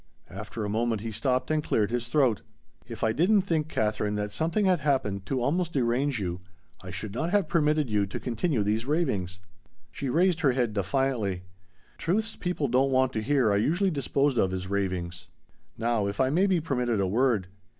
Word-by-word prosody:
After 105 +3 -5
a - - -2
moment 110 +1 0
he 115 0 -4
stopped 130 +5 -1
and 155 -1 +1
cleared 105 -5 +1
his 120 -1 -2
throat. 125 -5 +2 0.5
"If - - -7
I 110 - +3
didn't 190 - +3
think, 160 -5 0
Katherine, 105 -3 -1
that 105 0 -2
something 165 - 0
had 185 -3 +3
happened 120 -10 -1
to 130 - -1
almost 170 +5 0
derange 130 +1 +1
you, 90 -2 -3 0.4
I 95 - -9
should 95 +3 -6
not 160 +8 -1
have 200 -3 +2
permitted 155 -3 +2
you 105 -3 +1
to 95 - -5
continue 125 0 -1
these 110 +4 -1
ravings." 100 - -1 0.5
She 140 - -4
raised 170 +4 +2
her 135 -4 +3
head 120 -4 0
defiantly. 100 -2 -1 0.6
"Truths 220 +6 -1
people 175 -5 -2
don't 130 +2 +2
want 130 -1 +2
to 110 - -1
hear 130 -2 +2
are 100 - +3
usually 175 - +1
disposed 140 -2 +1
of 95 - +2
as 95 0 -4
ravings!" 90 -3 -3 0.5
"Now 115 -3 0
if 100 0 -5
I 130 0 +3
may 185 +6 +3
be 185 -3 +2
permitted 125 -8 -1
a 100 - +2
word. 110 0 +1
125 Hz, 190 wpm, -27 LUFS, 105-150 Hz, 0.6 s, I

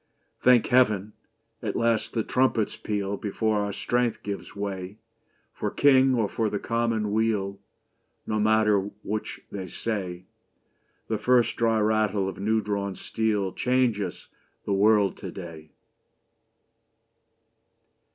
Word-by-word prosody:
Thank 125 -2 +5
Heaven! 110 -5 +2 0.5
At - - -3
last 115 -1 +1
the 115 - 0
trumpets 125 -4 +1
peal 100 -1 -3
Before 110 +1 -1
our 100 0 -1
strength 120 +3 -1
gives 100 -1 -6
way. 100 -1 -5 0.6
For - - -2
King 135 -2 +4
or 115 -3 +1
for 110 +1 -1
the 105 - -2
Commonweal 110 -3 0 0.7
No 110 0 -1
matter 105 -2 +3
which 110 +1 -4
they 95 -2 -5
say, 90 -3 -4 0.8
The 110 -2 -1
first 125 -2 +3
dry 115 -1 +2
rattle 105 -2 +1
of 95 - -6
new 110 +2 +1
drawn 100 -2 -2
steel 105 -3 -1
Changes 120 -8 0 0.4
the 100 - 0
world 100 -1 +3
to - - -7
day 80 -4 -9
105 Hz, 120 wpm, -26 LUFS, 100-115 Hz, 0.8 s, Thank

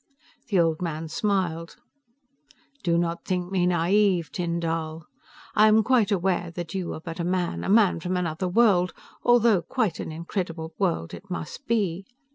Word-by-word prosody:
The 200 -6 +2
old 165 -1 +2
man 160 -2 -3
smiled. 180 -4 -1 1.1
"Do 170 -2 +2
not 170 0 -1
think 180 -1 -2
me 180 -2 +2
naive, 180 0 +2
Tyn 170 -1 -2
Dall. 165 -1 -3 0.5
I 215 0 +6
am 215 0 +5
quite 230 -2 +3
aware 180 -2 0
that 175 -3 -5
you 185 -3 -3
are - - -7
but 165 +1 -8
a - - -1
man, 180 0 -1
a - - -3
man 205 -4 +4
from 180 +2 -2
another 175 0 -2
world, 185 -3 +3 0.3
although 235 -5 +4
quite 205 +3 -1
an - - -5
incredible 165 0 -4
world 170 - 0
it 200 - -10
must 180 - -6
be. 195 -5 0
180 Hz, 165 wpm, -25 LUFS, 165-200 Hz, 1.1 s, I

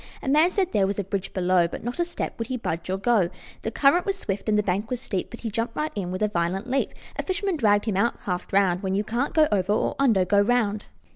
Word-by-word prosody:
A - - -6
man 305 +5 +5
said 370 -1 0
there 195 -2 +2
was 200 - -2
a 200 - -1
bridge 195 0 -4
below, 180 -2 +2
But - - -7
not 240 +7 -4
a 345 - +2
step 345 - -5
would 230 - -3
he 255 - -2
budge 170 -7 -4
or 190 - 0
go. 205 -4 +2 0.3
The - - -2
current 280 +9 +3
was 395 -1 -1
swift 200 - -3
and 210 - +3
the 210 - +2
bank 200 +3 -1
was 250 - -2
steep, 200 -7 -3
But 235 - -10
he 225 - -4
jumped 230 +2 -2
right 305 +1 -1
in 190 -4 -3
with 185 +3 -2
a - - +4
violent 190 +3 -1
leap. 270 +2 0 0.3
A - - 0
fisherman 385 0 -1
dragged 205 -7 +3
him 210 -4 -1
out 235 +4 +2
half 180 -2 -3
drowned: 195 -2 +2
"When 190 -1 -1
you 205 - +1
can't 240 +9 -2
go 310 -1 +5
over 200 0 +2
or - - 0
under, 225 -9 +4
go 200 +2 +4
round." 210 -2 +1
210 Hz, 275 wpm, -25 LUFS, 190-250 Hz, 0.3 s, man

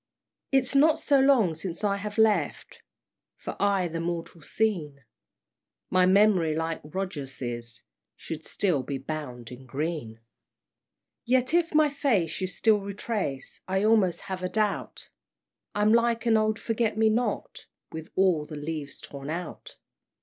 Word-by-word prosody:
"It's 270 -1 +2
not 300 +3 +5
so 280 -2 +3
long 260 -10 +4
since 170 +4 -6
I 200 -1 +1
have 205 +1 -6
left 210 -8 +1 0.6
For - - -6
aye 200 -3 +2
the 165 0 -4
mortal 170 0 -4
scene; 155 -10 -1 0.9
My 185 0 +4
memory 190 -5 +4
like 160 0 -2
Rogers's 135 -9 -5 0.3
Should 160 -1 -7
still 175 -7 0
be 140 +1 -4
bound 130 -4 -6
in 130 +1 -11
green! 140 -5 -4 1.0
"Yet 255 +3 +1
if 335 -2 +2
my 305 -1 +5
face 220 - 0
you 185 - 0
still 210 +3 +2
retrace, 200 - -4
I 190 +1 0
almost 210 -6 +3
have 190 -1 -5
a 185 - -2
doubt 210 0 -2 0.7
I'm 210 +1 +3
like 235 0 +2
an 230 -1 +4
old 215 0 +2
Forget 225 -2 -1
me 220 0 +4
not, 235 +3 -2 0.2
With 160 0 -7
all 180 -6 +2
the 155 - -8
leaves 145 -1 -5
torn 140 0 -8
out! 170 +2 -6
185 Hz, 140 wpm, -27 LUFS, 155-220 Hz, 1.0 s, not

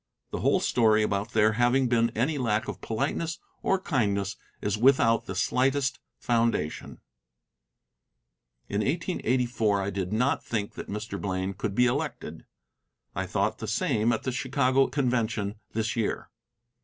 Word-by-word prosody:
The - - -3
whole - - +3
story 110 -3 +3
about 105 +1 -1
there 110 0 +4
having 120 +3 +2
been 115 -1 +3
any 140 +6 0
lack 110 -4 0
of - - -6
politeness 145 +7 -2 0.2
or 195 - +1
kindness 100 - 0 0.2
is 105 - -1
without 115 -1 +4
the 95 - -4
slightest 130 +7 +1 0.2
foundation. 115 -9 -1 1.7
In 100 - -1
1884 125 - 0
I 100 - -2
did 95 -1 -3
not 125 +6 +1
think 105 -3 -3
that - - -8
Mr. 105 +2 -5
Blaine 95 0 -2
could 100 +1 -4
be 125 - +4
elected. 140 +4 -3 0.7
I - - -2
thought - - 0
the - - -5
same 110 +2 +1
at - - -1
the 130 - -1
Chicago 130 +1 +2
convention 115 -6 -1
this 110 0 -1
year. 115 -3 -2
115 Hz, 145 wpm, -27 LUFS, 105-130 Hz, 1.7 s, there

